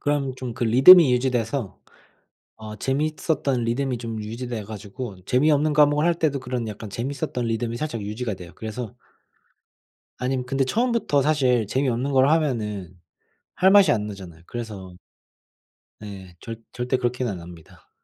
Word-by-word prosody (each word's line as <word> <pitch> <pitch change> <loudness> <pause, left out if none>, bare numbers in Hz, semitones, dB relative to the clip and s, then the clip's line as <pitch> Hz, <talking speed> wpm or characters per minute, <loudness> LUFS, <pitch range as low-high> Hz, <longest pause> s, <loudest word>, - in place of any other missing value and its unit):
그럼 145 -3 -1
좀 130 -2 -6
그 120 - -3
리듬이 135 +7 +8
유지돼서 125 - -1 0.8
어 110 -1 -9
재미있었던 140 - -1
리듬이 125 +2 -1
좀 115 -2 -5
유지돼 115 +1 -5
가지고 105 +1 -7
재미없는 150 +4 +2
과목을 150 +1 +4
할 175 - +3
때도 155 -5 0
그런 125 -2 -3
약간 105 0 -8
재밌었던 125 +2 -3
리듬이 115 0 -2
살짝 135 -4 -4
유지가 110 +2 -4
돼요. 90 -2 -11
그래서 110 0 -6 1.2
아님 125 0 -2
근데 135 +1 0
처음부터 230 - +1
사실 130 -7 +2
재미없는 130 +2 -1
걸 130 +1 +4
하면은 110 - -1 0.6
할 190 - +4
맛이 200 -1 +7
안 105 -2 0
나잖아요. 95 -5 -10
그래서 105 -6 -7 1.0
네 95 -4 -10
절 115 -1 -8
절대 125 +1 -1
그렇게는 125 -2 -1
안 90 - -7
합니다. 85 -2 -14
125 Hz, 330 characters per minute, -23 LUFS, 110-140 Hz, 1.2 s, 리듬이